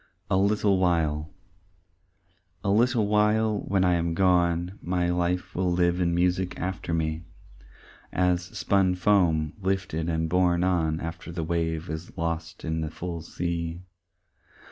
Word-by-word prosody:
"A -, -, +4 dB
Little 100 Hz, 0 st, +2 dB
While" 80 Hz, -4 st, +1 dB, 1.3 s
A 100 Hz, -, +1 dB
little 115 Hz, +1 st, +3 dB
while 105 Hz, +1 st, +2 dB
when 95 Hz, -2 st, 0 dB
I 90 Hz, -1 st, +3 dB
am 85 Hz, -1 st, 0 dB
gone 90 Hz, 0 st, +2 dB
My 90 Hz, 0 st, 0 dB
life 90 Hz, +1 st, -1 dB
will 90 Hz, -1 st, 0 dB
live 90 Hz, 0 st, +2 dB
in 85 Hz, -1 st, +1 dB
music 90 Hz, +1 st, 0 dB
after 95 Hz, -2 st, -4 dB
me, 80 Hz, 0 st, -1 dB, 0.9 s
As 90 Hz, 0 st, +2 dB
spun 95 Hz, 0 st, +1 dB
foam 85 Hz, -6 st, +2 dB
lifted 95 Hz, -4 st, -1 dB
and 80 Hz, 0 st, 0 dB
borne 90 Hz, 0 st, +2 dB
on 80 Hz, -4 st, +1 dB
After 85 Hz, +1 st, -6 dB
the 85 Hz, -1 st, -3 dB
wave 80 Hz, 0 st, -1 dB
is 80 Hz, +2 st, -7 dB
lost 85 Hz, 0 st, -3 dB
in 80 Hz, 0 st, -1 dB
the 80 Hz, -, -2 dB
full 85 Hz, +1 st, -5 dB
sea. 85 Hz, +1 st, -4 dB
90 Hz, 140 wpm, -26 LUFS, 80-95 Hz, 1.3 s, A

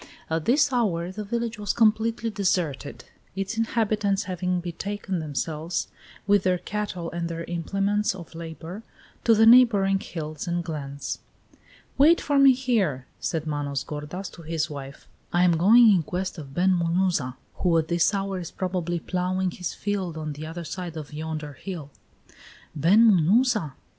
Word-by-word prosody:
At 160 Hz, -1 st, -1 dB
this 275 Hz, +2 st, +3 dB
hour 180 Hz, -8 st, 0 dB
the 210 Hz, +3 st, -5 dB
village 235 Hz, +1 st, -3 dB
was 205 Hz, -2 st, -1 dB
completely 225 Hz, 0 st, +2 dB
deserted, 175 Hz, -8 st, -1 dB, 0.3 s
its 195 Hz, +3 st, -3 dB
inhabitants 215 Hz, -3 st, 0 dB
having 180 Hz, -1 st, -1 dB
betaken 185 Hz, +2 st, -4 dB
themselves, 155 Hz, +2 st, -3 dB, 0.4 s
with 205 Hz, -1 st, +4 dB
their 185 Hz, -1 st, +2 dB
cattle 185 Hz, -3 st, -4 dB
and 170 Hz, 0 st, -3 dB
their 165 Hz, 0 st, -4 dB
implements 195 Hz, +4 st, -1 dB
of 170 Hz, -3 st, -11 dB
labor, 165 Hz, +4 st, -7 dB, 0.4 s
to 230 Hz, -, +6 dB
the 220 Hz, +1 st, +5 dB
neighboring 220 Hz, -5 st, +6 dB
hills 155 Hz, -4 st, -6 dB
and 175 Hz, 0 st, -1 dB
glens. 145 Hz, -4 st, -5 dB, 0.8 s
"Wait 320 Hz, +5 st, +6 dB
for 285 Hz, -1 st, +1 dB
me 275 Hz, -1 st, +8 dB
here," 215 Hz, -, 0 dB
said 160 Hz, -2 st, -2 dB
Manos 145 Hz, -2 st, -2 dB
gordas 150 Hz, +6 st, -6 dB
to 170 Hz, -, -12 dB
his 160 Hz, -1 st, -2 dB
wife. 140 Hz, -1 st, -9 dB, 0.2 s
"I 175 Hz, +1 st, +3 dB
am 175 Hz, -2 st, +4 dB
going 220 Hz, +7 st, +7 dB
in 180 Hz, -, +3 dB
quest 185 Hz, +3 st, -4 dB
of 135 Hz, -2 st, -10 dB
Ben 185 Hz, +2 st, +3 dB
Munuza, 170 Hz, -6 st, 0 dB, 0.2 s
who 175 Hz, -3 st, +2 dB
at 160 Hz, -1 st, +1 dB
this 170 Hz, +2 st, +2 dB
hour 195 Hz, -2 st, -2 dB
is 170 Hz, -, -6 dB
probably 175 Hz, -2 st, -2 dB
ploughing 185 Hz, +1 st, -1 dB
his 180 Hz, -1 st, -5 dB
fields 190 Hz, -5 st, -3 dB
on 155 Hz, -1 st, -4 dB
the 155 Hz, +2 st, -7 dB
other 170 Hz, +2 st, -6 dB
side 170 Hz, 0 st, -6 dB
of 150 Hz, -1 st, -8 dB
yonder 155 Hz, -1 st, -5 dB
hill." 155 Hz, -1 st, -7 dB, 0.8 s
"Ben 185 Hz, +10 st, +5 dB
Munuza!" 210 Hz, -, +3 dB
180 Hz, 160 wpm, -25 LUFS, 160-205 Hz, 0.8 s, me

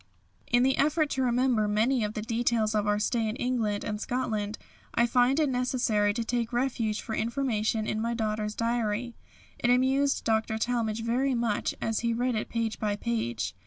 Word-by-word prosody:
In 245 Hz, +1 st, +3 dB
the 265 Hz, 0 st, +2 dB
effort 305 Hz, +1 st, +2 dB
to 265 Hz, -, 0 dB
remember 245 Hz, -3 st, +2 dB
many 225 Hz, +4 st, +2 dB
of 210 Hz, 0 st, -3 dB
the 215 Hz, -, -3 dB
details 230 Hz, -1 st, +1 dB
of 210 Hz, -1 st, 0 dB
our 210 Hz, 0 st, +2 dB
stay 220 Hz, +1 st, 0 dB
in 215 Hz, -, -3 dB
England 230 Hz, -5 st, -1 dB
and 210 Hz, 0 st, -4 dB
Scotland, 220 Hz, -4 st, -2 dB, 0.4 s
I 235 Hz, -, +4 dB
find 250 Hz, +4 st, +3 dB
it 305 Hz, -, +3 dB
necessary 245 Hz, -5 st, +1 dB
to 230 Hz, -, -1 dB
take 235 Hz, 0 st, -1 dB
refuge 240 Hz, -4 st, -1 dB
for 220 Hz, -, -6 dB
information 225 Hz, -2 st, 0 dB
in 215 Hz, 0 st, -2 dB
my 235 Hz, +1 st, -1 dB
daughter's 215 Hz, -1 st, -2 dB
diary. 230 Hz, 0 st, -1 dB, 0.5 s
It 240 Hz, -, +1 dB
amused 265 Hz, +3 st, +2 dB
Dr. 220 Hz, 0 st, +1 dB
Talmage 225 Hz, -1 st, -1 dB
very 255 Hz, +3 st, +1 dB
much 235 Hz, -3 st, -1 dB
as 225 Hz, -1 st, 0 dB
he 235 Hz, -1 st, 0 dB
read 245 Hz, +2 st, 0 dB
it 215 Hz, -, -2 dB
page 230 Hz, -1 st, -2 dB
by 210 Hz, -1 st, 0 dB
page. 120 Hz, -, -2 dB
230 Hz, 185 wpm, -28 LUFS, 215-245 Hz, 0.5 s, I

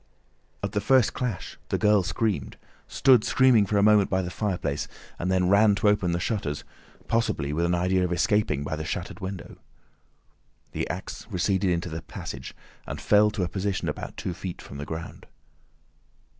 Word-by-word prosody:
At -, -, -1 dB
the 105 Hz, -, -1 dB
first 125 Hz, +2 st, +4 dB
clash 120 Hz, -8 st, -4 dB
the -, -, +1 dB
girl 105 Hz, -2 st, +4 dB
screamed, 95 Hz, -, -2 dB, 0.3 s
stood 130 Hz, -5 st, +4 dB
screaming 125 Hz, -6 st, +4 dB
for 105 Hz, -, +1 dB
a 100 Hz, -, +4 dB
moment 105 Hz, -2 st, +5 dB
by 95 Hz, 0 st, +1 dB
the 90 Hz, -, -5 dB
fireplace, 90 Hz, -8 st, -2 dB, 0.3 s
and 90 Hz, +2 st, -1 dB
then 90 Hz, -1 st, +2 dB
ran 100 Hz, +2 st, +5 dB
to 100 Hz, +1 st, +3 dB
open 100 Hz, -4 st, +2 dB
the 85 Hz, -, 0 dB
shutters—possibly 100 Hz, 0 st, -3 dB
with 85 Hz, +3 st, +1 dB
an 90 Hz, +1 st, +2 dB
idea 90 Hz, +1 st, +1 dB
of 90 Hz, -, -1 dB
escaping 105 Hz, -, +1 dB
by 70 Hz, -, -3 dB
the 80 Hz, -, -4 dB
shattered -, -, -4 dB
window. 95 Hz, -1 st, -7 dB, 1.1 s
The -, -, -3 dB
axe -, -, -6 dB
receded 95 Hz, +1 st, +1 dB
into 85 Hz, 0 st, -1 dB
the 80 Hz, 0 st, -5 dB
passage, -, -, -8 dB, 0.3 s
and -, -, -5 dB
fell 105 Hz, 0 st, +4 dB
to 105 Hz, -3 st, -2 dB
a -, -, 0 dB
position 95 Hz, +2 st, -2 dB
about -, -, -5 dB
two 90 Hz, -, -3 dB
feet 90 Hz, 0 st, -6 dB
from 70 Hz, -, -10 dB
the 75 Hz, -, -4 dB
ground. 80 Hz, +1 st, -7 dB
95 Hz, 175 wpm, -26 LUFS, 85-105 Hz, 1.1 s, moment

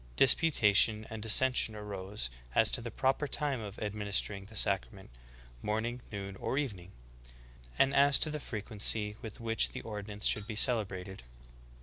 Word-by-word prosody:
Disputation 110 Hz, -, +4 dB
and 110 Hz, -1 st, -6 dB
dis 110 Hz, 0 st, +6 dB
sension 130 Hz, -4 st, +2 dB
arose 100 Hz, -, -5 dB, 0.2 s
as 110 Hz, -, +5 dB
to -, -, +1 dB
the 120 Hz, -, -6 dB
proper 135 Hz, +4 st, -1 dB
time 140 Hz, -3 st, -1 dB
of 105 Hz, -2 st, -8 dB
administering 105 Hz, -1 st, -3 dB
the 110 Hz, +2 st, -13 dB
sac 100 Hz, -2 st, +2 dB
rament 95 Hz, -2 st, -15 dB, 0.3 s
— -, -, -23 dB
morning, 115 Hz, +4 st, -3 dB
noon, 100 Hz, -2 st, -6 dB
or 130 Hz, -, -3 dB
evening; 100 Hz, -11 st, -4 dB, 0.9 s
and 135 Hz, -, +3 dB
as 140 Hz, 0 st, +5 dB
to 155 Hz, -, +3 dB
the 150 Hz, -, -4 dB
frequency 105 Hz, -2 st, -1 dB
with 110 Hz, -2 st, -9 dB
which 115 Hz, -1 st, +1 dB
the -, -, -6 dB
ordinance 105 Hz, -1 st, -6 dB
should 105 Hz, -1 st, +2 dB
be 110 Hz, -, -6 dB
celebrated." 95 Hz, -5 st, 0 dB
105 Hz, 160 wpm, -31 LUFS, 100-120 Hz, 0.9 s, dis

